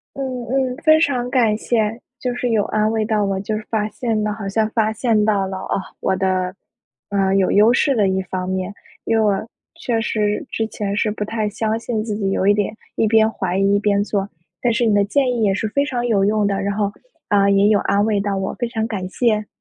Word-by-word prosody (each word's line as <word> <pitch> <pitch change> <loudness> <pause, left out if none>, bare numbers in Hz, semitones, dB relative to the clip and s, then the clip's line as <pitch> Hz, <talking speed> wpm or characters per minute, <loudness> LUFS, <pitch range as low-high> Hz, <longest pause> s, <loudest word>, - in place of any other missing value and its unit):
嗯， 260 -3 -4
嗯， 260 0 0
非 315 +2 +4
常 255 -6 +1
感 235 -5 +2
谢， 225 0 -1 0.2
就 250 - -1
是 245 - -1
有 220 -3 +3
安 215 0 +1
慰 220 -1 0
到 215 -2 +1
我， 195 -1 -1
就 215 +2 -2
是 215 - -6
发 215 -2 0
现 220 -1 -2
了 210 - -1
好 205 -2 -5
像 215 +2 0
发 220 -1 +1
现 220 -2 +1
到 205 -2 +2
了， 190 0 -5
啊， 190 - -3 0.3
我 - - +1
的， 185 -1 0 0.5
嗯， 195 -1 +1
有 190 -1 +2
优 215 +4 +5
势 275 +1 +2
的 210 -3 +3
一 190 0 0
方 185 0 -4
面， 190 +1 -2 0.3
因 225 - +1
为 220 - +3
我 205 +2 0 0.3
确 230 -2 -1
实 210 +4 -1
之 220 -1 -1
前 200 -2 -3
是 215 0 +1
不 210 0 -3
太 215 -1 -2
相 220 +1 -1
信 225 -2 -2
自 215 -2 -3
己， 200 -2 -1
有 190 - 0
一 205 - +5
点 210 +1 -1 0.2
一 220 - +1
边 220 0 +4
怀 190 -4 -2
疑 195 +1 +3
一 205 - +2
边 205 -1 +2
做， 200 -2 -2 0.3
但 240 - +2
是 235 0 +1
你 215 - +3
的 205 0 +4
建 255 +5 +1
议 235 - -1
也 200 -2 +3
是 195 +3 -1
非 280 +6 +1
常 245 -4 -2
有 200 -4 +2
用 210 0 +2
的， 200 0 -1
然 200 0 -2
后， 205 -1 0 0.4
呃， 200 -1 +4
也 200 0 +4
有 210 -1 +4
安 200 +1 +1
慰 210 -2 +1
到 200 -1 -1
我， 190 0 -3
非 240 - -3
常 225 -1 -2
感 195 -5 -4
谢。 215 0 0
215 Hz, 260 characters per minute, -20 LUFS, 200-225 Hz, 0.5 s, 优